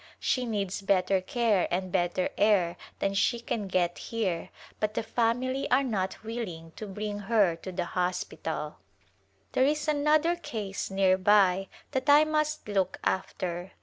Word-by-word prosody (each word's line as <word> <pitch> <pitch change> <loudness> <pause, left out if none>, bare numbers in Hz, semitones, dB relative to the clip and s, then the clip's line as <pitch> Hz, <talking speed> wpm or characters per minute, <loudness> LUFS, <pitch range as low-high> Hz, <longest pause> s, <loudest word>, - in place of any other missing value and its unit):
She 250 -2 0
needs 200 -3 -2
better 195 -1 +2
care 215 -1 +1
and 185 +1 -2
better 175 +1 +1
air 195 -5 +3 0.2
than 195 - 0
she 235 +4 +2
can 225 -3 -3
get 175 -2 0
here 200 -8 -2 0.3
but 215 0 -1
the - - 0
family 245 +4 0
are 265 +2 +4
not 195 -7 -2
willing 195 -8 -5
to 215 - -6
bring 205 +1 -4
her 205 -4 +2
to 185 +3 -7
the 180 -1 -2
hospital. 180 -4 -3 0.7
There 260 - +3
is 300 +3 +1
another 305 +3 +3
case 210 - -5
near 190 -1 +3
by 195 -1 +4 0.2
that 265 0 -1
I 295 +1 +8
must 305 -2 -1
look 190 -3 0
after. 185 -1 -2
200 Hz, 150 wpm, -28 LUFS, 185-240 Hz, 0.7 s, I